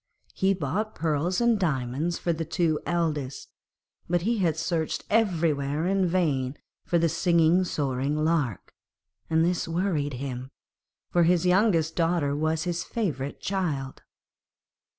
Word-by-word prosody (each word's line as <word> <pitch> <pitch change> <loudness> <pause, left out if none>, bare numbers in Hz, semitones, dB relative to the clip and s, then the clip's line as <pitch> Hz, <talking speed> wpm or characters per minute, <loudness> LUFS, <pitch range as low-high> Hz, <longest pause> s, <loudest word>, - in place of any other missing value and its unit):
He 195 +1 +2
bought 190 +7 -2
pearls 160 +3 0
and 235 -3 +3
diamonds 150 0 -1
for 170 - 0
the 165 0 -3
two 160 -1 0
eldest, 150 -5 -2 0.6
but 175 -1 +1
he 230 +2 +1
had 170 -5 +1
searched 165 -3 -2
everywhere 160 -8 +1
in 190 0 +2
vain 145 -7 0 0.3
for 175 - +1
the 170 0 +3
singing, 170 +1 +3
soaring 140 -4 -1
lark, 155 - -1 0.6
and 160 0 +3
this 175 -1 0
worried 165 -4 -1
him, 130 0 -5 0.6
for 175 - +3
his 175 +1 +3
youngest 180 -4 +3
daughter 165 -4 +1
was 155 +1 0
his 175 -1 -2
favourite 150 - -3
child. 155 -9 -2
165 Hz, 130 wpm, -26 LUFS, 145-180 Hz, 0.6 s, and